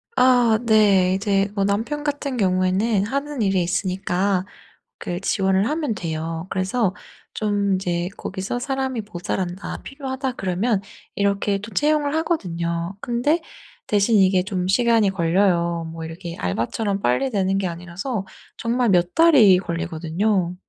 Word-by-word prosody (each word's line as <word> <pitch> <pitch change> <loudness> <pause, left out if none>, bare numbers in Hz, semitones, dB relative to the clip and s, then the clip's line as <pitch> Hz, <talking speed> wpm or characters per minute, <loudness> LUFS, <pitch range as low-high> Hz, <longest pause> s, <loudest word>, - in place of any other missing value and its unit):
아 245 -3 +5
네. 200 -5 +4
이제 195 0 +1
뭐 200 - +1
남편 225 +9 -1
같은 285 -3 -2
경우에는 190 +2 +2
하는 280 +3 -3
일이 195 -3 +2
있으니까 185 +1 0 0.5
그 175 0 -4
지원을 195 +1 +1
하면 300 -6 -1
돼요. 165 -2 -4
그래서 190 +1 0 0.4
좀 205 -2 0
이제 175 -2 -1
거기서 190 +5 -4
'사람이 265 -3 -2
모자란다. 180 +1 -4
필요하다.' 270 -1 -4
그러면 195 0 -1 0.3
이렇게 200 0 +1
또 210 +3 -9
채용을 295 -1 +1
하거든요. 170 - -2
근데 245 +9 +1 0.5
대신 210 +2 +3
이게 190 -1 +4
좀 185 -2 -2
시간이 230 -1 +3
걸려요. 170 -2 +1
뭐 165 0 -7
이렇게 165 +1 -7
알바처럼 195 - -2
빨리 160 - +1
되는 195 -3 +1
게 195 - -1
아니라서 180 +6 -4 0.3
정말 235 0 0
몇 175 -1 +2
달이 275 - +6
걸리거든요. 170 +2 -1
195 Hz, 300 characters per minute, -22 LUFS, 180-235 Hz, 0.5 s, 달이